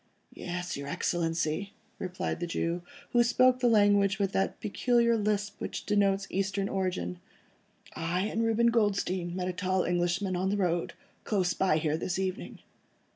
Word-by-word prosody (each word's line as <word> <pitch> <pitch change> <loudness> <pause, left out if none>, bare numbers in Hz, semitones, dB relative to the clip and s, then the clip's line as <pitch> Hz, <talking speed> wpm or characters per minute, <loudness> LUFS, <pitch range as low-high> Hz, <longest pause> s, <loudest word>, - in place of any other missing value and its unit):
"Yes, 180 0 -4
your 140 0 -6
Excellency," 165 +4 -1 0.3
replied 185 0 -3
the 175 - -2
Jew, 170 +1 -1 0.3
who 240 0 +5
spoke 255 +1 +4
the 250 - +3
language 205 -3 +4
with 200 -2 0
that 195 - -1
peculiar 235 +2 +2
lisp 210 -1 -1
which - - -4
denotes 200 -1 +2
Eastern 195 +1 -1
origin, 180 - -2 0.8
"I 170 +3 -1
and 220 +3 -1
Reuben 230 +1 +3
Goldstein 195 -5 0
met 180 -1 -2
a 185 - -2
tall 185 +1 0
Englishman, 175 +2 0
on 185 +2 0
the 205 - 0
road, 175 -3 0 0.3
close 185 -5 +1
by 185 -5 +2
here 155 -1 0
this 175 +2 -2
evening." 190 -1 -4
190 Hz, 155 wpm, -29 LUFS, 175-205 Hz, 0.8 s, who